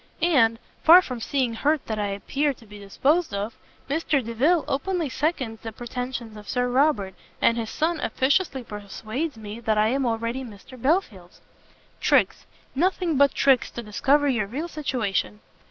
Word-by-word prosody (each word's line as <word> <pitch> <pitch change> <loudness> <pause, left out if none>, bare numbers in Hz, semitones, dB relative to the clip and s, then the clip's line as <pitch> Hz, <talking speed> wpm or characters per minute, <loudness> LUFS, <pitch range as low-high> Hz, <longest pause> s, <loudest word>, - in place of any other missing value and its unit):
And, 245 -10 +4 0.2
far 350 +3 +8
from 250 -6 -5
seeming 255 0 -1
hurt 295 +5 0
that 220 -1 -3
I 205 - 0
appear 275 +9 -1
to 230 - -18
be 210 -1 -12
disposed 280 - 0
of, 205 +3 -3 0.3
Mr 285 -3 0
Delvile 280 +9 +2
openly 335 +2 -1
seconds 260 -6 -2
the 225 - -6
pretensions 240 -1 -6
of 210 -1 -11
Sir 250 -1 0
Robert, 245 -7 +2 0.3
and 230 - +3
his 230 -2 -3
son 325 +1 -1
officiously 275 0 0
persuades 220 - -5
me 215 +1 -8
that 220 -2 0
I 215 +1 +3
am 265 +1 0
already 230 +3 -2
Mr 240 +2 -12
Belfield's." 230 - -1 0.6
"Tricks, - - +2 0.3
nothing 350 +2 +1
but 280 +1 +4
tricks 270 -3 +3
to 240 - -7
discover 280 +7 +2
your 235 -7 +1
real 285 +10 -4
situation." 245 - -2
250 Hz, 160 wpm, -25 LUFS, 220-290 Hz, 0.6 s, far